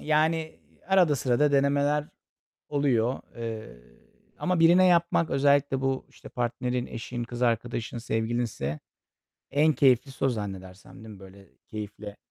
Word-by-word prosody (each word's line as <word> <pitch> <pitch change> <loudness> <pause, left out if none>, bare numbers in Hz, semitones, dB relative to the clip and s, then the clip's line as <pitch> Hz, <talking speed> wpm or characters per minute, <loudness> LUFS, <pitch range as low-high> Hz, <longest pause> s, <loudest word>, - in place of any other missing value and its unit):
yani, 160 +1 0 0.3
arada 180 -7 +4
sırada 135 +4 +2
denemeler 140 +1 +2 0.6
oluyor. 130 -4 +1 0.2
Eee, 110 - -7 0.6
ama 180 -2 0
birine 175 +3 +6
yapmak, 170 -2 +2
özellikle 140 -1 +2
bu, 135 0 -1
işte, - - -14
partnerin, 125 +1 -2
eşin, 120 +1 -5
kız 120 +1 -7
arkadaşın, 120 0 -1
sevgilinse 110 - -2 0.7
en 150 +3 +3
keyiflisi 135 -1 +2
o 135 - +4
zannedersem, 95 -5 -6
değil - - -11
mi? - - -14
Böyle 95 0 -14 0.2
keyifle 105 -1 -7
125 Hz, 120 wpm, -27 LUFS, 115-145 Hz, 0.7 s, birine